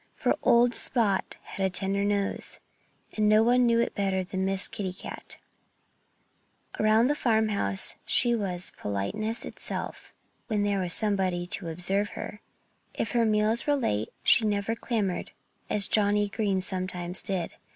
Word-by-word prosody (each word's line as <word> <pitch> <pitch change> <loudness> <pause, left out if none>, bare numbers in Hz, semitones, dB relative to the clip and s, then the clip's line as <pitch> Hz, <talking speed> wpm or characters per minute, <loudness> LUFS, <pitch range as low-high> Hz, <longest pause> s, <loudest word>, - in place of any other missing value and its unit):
For - - 0
old 240 0 +4
Spot 215 -6 0
had 195 - -6
a 190 - +2
tender 195 +2 +1
nose. 200 -1 -1 0.6
And 215 -1 +1
no 215 +1 +5
one 245 +1 +3
knew 230 0 +3
it 235 - 0
better 190 -2 -1
than 190 0 -3
Miss 195 0 +5
Kitty 190 -3 -5
Cat. 185 - -9 1.4
Around 215 +2 +4
the 290 - +2
farmhouse 215 - +1
she 240 -1 +3
was 185 -5 -2
politeness 210 - -2
itself - - -5 0.4
when 210 -3 0
there 200 -1 0
was 180 +3 +4
anybody 190 -4 0
to 180 -1 0
observe 190 +5 -1
her. 210 - -7 0.5
If 225 - -3
her 235 -1 +2
meals 215 +3 +1
were 290 - +3
late 110 - -1
she 235 - +5
never 205 +1 -1
clamored, 210 -6 -3 0.4
as 200 -1 +3
Johnnie 205 -1 +2
Green 200 -2 -1
sometimes 185 -1 -3
did. 185 -4 -3
205 Hz, 150 wpm, -27 LUFS, 190-220 Hz, 1.4 s, no